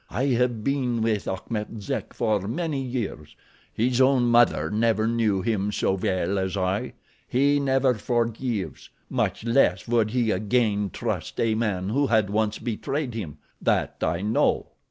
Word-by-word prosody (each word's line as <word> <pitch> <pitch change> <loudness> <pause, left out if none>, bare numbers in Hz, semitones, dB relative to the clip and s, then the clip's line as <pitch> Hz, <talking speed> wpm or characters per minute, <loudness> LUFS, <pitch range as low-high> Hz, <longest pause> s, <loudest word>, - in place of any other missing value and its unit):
I 130 +8 0
have 120 -3 +1
been 125 -4 0
with 110 -3 0
Achmet 105 +3 -4
Zek 100 - -4
for 105 -4 0
many 155 +2 -2
years—his 120 - -3
own 130 -1 +4
mother 120 -2 +3
never 110 0 +2
knew 110 -5 +1
him 105 -3 0
so 95 - +1
well 95 0 0
as 95 +1 -2
I. 95 +1 -1 0.3
He 140 +3 +3
never 135 -1 +2
forgives—much 115 -2 -2
less 115 -7 +2
would 115 -2 +2
he 120 -1 +1
again 105 -3 +1
trust - - -4
a 115 -1 +2
man 100 -4 -1
who 140 +5 +1
had 110 -4 +2
once 110 0 0
betrayed 125 +3 -3
him; 85 -10 -6 0.2
that - - 0
I 85 +2 0
know. 110 +2 +1
115 Hz, 145 wpm, -25 LUFS, 105-125 Hz, 0.3 s, own